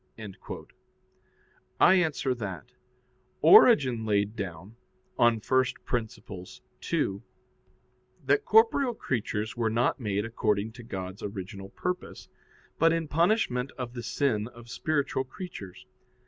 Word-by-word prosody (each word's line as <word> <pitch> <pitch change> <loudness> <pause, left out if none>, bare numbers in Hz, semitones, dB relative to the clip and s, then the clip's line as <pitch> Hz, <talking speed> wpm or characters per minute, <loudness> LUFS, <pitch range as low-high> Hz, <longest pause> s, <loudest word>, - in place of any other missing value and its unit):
I - - +7
answer 155 -7 +1
that, 95 - -7 0.7
Origen 125 -5 +7
laid 105 0 0
down 95 +1 -7 0.4
[*Peri 125 +2 +2
Archon 115 -3 -1 0.8
ii.] 100 +1 0 1.0
that 420 - +3
corporeal 285 - +4
creatures 110 - -3
were 115 -2 0
not 115 +5 +1
made 105 -3 -1
according 110 -2 -1
to 120 +2 -12
God's 95 -3 -6
original 95 -1 -7
purpose, 180 - -5 0.5
but 165 +1 +5
in 165 -1 -1
punishment 150 - +1
of 125 -2 -5
the 120 - -5
sin 115 -4 0
of 120 -1 -13
spiritual 140 -3 -1
creatures. 125 - -9
120 Hz, 105 wpm, -28 LUFS, 105-140 Hz, 1.0 s, I